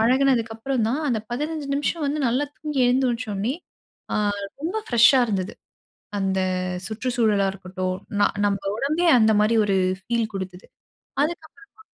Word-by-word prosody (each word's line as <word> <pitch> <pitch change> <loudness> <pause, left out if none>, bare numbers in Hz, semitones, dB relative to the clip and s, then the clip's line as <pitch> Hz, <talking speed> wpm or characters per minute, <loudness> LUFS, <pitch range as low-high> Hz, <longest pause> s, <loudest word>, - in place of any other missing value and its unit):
பழனதுக்கு 250 -1 +3
அப்புறம் 250 0 -1
தான் 265 +6 0
அந்த 235 -4 +1
15 295 +3 -3
நிமிஷம் 295 +2 -1
வந்து 295 +2 -1
நல்லா 255 +5 +1
தூங்கி 300 -3 -2
எழுந்துச்சோனே 245 -3 0 1.1
ரொம்ப 350 +6 -2
ஆ - - -23
பிரஷ்ஷா 240 +2 +6
இருந்தது. 195 -3 -2 0.7
அந்த 190 -1 0 0.5
சுற்றுச்சூழலா 220 -3 +1
இருக்கட்டும், 185 -1 -4 0.2
ந - - +5 0.2
நம்ம 200 -1 +1 0.2
உடம்பே 310 +7 +1
அந்த 220 -1 +5
மாரி 215 +2 +3
ஒரு 200 -1 +1 0.3
பீல் 230 -2 0
குடுத்தது. 190 -1 -6 0.6
அதுக்கப்பறமா 345 +6 -7
235 Hz, 130 wpm, -24 LUFS, 205-280 Hz, 1.1 s, பிரஷ்ஷா